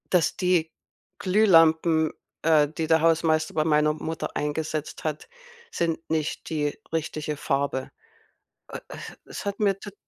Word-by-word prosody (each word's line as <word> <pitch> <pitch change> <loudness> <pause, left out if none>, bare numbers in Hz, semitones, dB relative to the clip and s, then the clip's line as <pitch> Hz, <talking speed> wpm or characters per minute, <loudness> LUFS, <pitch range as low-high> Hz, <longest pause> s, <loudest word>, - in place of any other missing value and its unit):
Dass 175 -4 +3
die 180 -3 +1 0.5
Glühlampen, 165 -5 +4 0.3
äh, 155 -2 +5
die 160 +2 -4
der 160 0 +4
Hausmeister 160 -1 +2
bei 155 - +2
meiner 150 -1 +3
Mutter 160 +1 -5
eingesetzt 155 +1 -3
hat 155 -1 -3 0.5
sind 165 -1 0
nicht 155 -1 -2
die 150 -2 -1
richtige 155 -2 -3
Farbe. 140 -2 -1 0.8
Äh - - -7
äh, - - -8 0.3
es - - -8
hat 200 0 -3
mir 200 -2 +2
tat 200 -1 -9
160 Hz, 135 wpm, -25 LUFS, 150-165 Hz, 0.8 s, äh